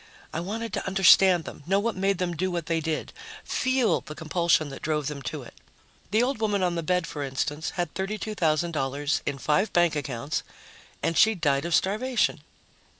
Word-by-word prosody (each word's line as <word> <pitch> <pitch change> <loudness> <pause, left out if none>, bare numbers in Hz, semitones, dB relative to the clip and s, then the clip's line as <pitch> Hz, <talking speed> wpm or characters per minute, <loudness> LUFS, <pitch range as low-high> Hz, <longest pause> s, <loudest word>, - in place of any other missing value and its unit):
I 160 - -2
wanted 215 +4 -4
to - - -3
understand 190 -2 +6
them, - - -9
know 195 +2 +3
what 230 +1 -1
made 195 +1 +1
them 175 -1 -2
do 185 +4 -1
what 170 -3 -3
they 165 0 0
did, 160 -1 -3 0.3
feel 260 -2 +1
the 150 - -9
compulsion 160 -1 +1
that 135 - -9
drove 150 -2 -1
them 140 0 -4
to - - -5
it. - - -13 0.6
The 220 +4 +3
old 260 -1 -1
woman 205 -3 +1
on 180 -1 +1
the 170 - -2
bed, 180 +1 0
for 150 - -6
instance, 145 +3 -2
had 175 -3 -2
$32,000 160 -8 -1
in 145 - -1
five 185 - +1
bank 175 -2 +3
accounts... 140 0 -3 0.6
and 165 - +1
she'd 220 0 +4
died 140 -2 +1
of 170 -1 +2
starvation. 235 +6 +1
175 Hz, 185 wpm, -26 LUFS, 150-195 Hz, 0.6 s, understand